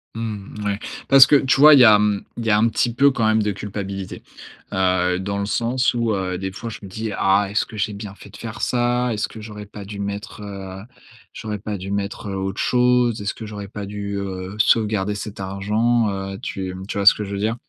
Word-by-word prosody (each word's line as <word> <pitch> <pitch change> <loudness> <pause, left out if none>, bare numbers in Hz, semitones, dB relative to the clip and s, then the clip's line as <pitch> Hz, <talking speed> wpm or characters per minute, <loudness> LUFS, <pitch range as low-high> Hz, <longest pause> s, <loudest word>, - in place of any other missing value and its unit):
Mmh, 110 -2 -6
mouais, 100 0 -2 0.3
parce 135 -1 +9
que, 145 +2 +5
tu 135 +1 +2
vois, 150 +1 +10
il 140 - +8
y 125 - +9
a, 105 -2 +8
mmh, 105 -1 +1
il 115 - -4
y 110 - +1
a 105 - +5
un 115 +2 +4
petit 120 +1 0
peu 140 +3 +4
quand 115 -4 0
même 110 0 +3
de 105 -1 0
culpabilité, 100 -1 -6 0.5
heu, 90 -1 +1
dans 100 +1 -3
le 100 - -1
sens 120 +5 +1
où 115 -2 0
heu, 95 -2 -2
des 95 0 -4
fois, 115 +4 -7
je 110 - -8
me 100 - -7
dis: 110 +3 -4
«Ah! 100 +1 +3
Est-ce 105 - 0
que 110 - -11
j'ai 105 0 -1
bien 100 -1 -7
fait - - -14
de - - -15
faire 115 -1 -7
ça? 120 0 +1
Est-ce 105 - -2
que 110 - -10
j'aurais 105 -1 -8
pas 100 0 -10
dû 100 0 -8
mettre, 100 +1 -5
heu, 95 -1 -8 0.5
j'aurais 105 -2 -5
pas 105 0 -4
dû 95 +1 -6
mettre, 100 +1 -3
heu, 100 - -4
autre 95 0 -3
chose? 125 -2 +2
Est-ce 100 0 -2
que 110 - -9
j'aurais 105 -2 -7
pas 105 -1 -6
dû, 100 0 -5
heu, 95 0 -5
sauvegarder 105 -2 +2
cet 105 0 -7
argent, 105 +4 +1
heu?» 95 0 -4
tu, 95 -1 -4
mmh, 95 +1 -8
tu - - -4
vois 100 - -1
ce - - +10
que 105 - -5
je 100 - -7
veux 100 - -3
dire? 110 +3 0
105 Hz, 250 wpm, -21 LUFS, 100-115 Hz, 0.5 s, vois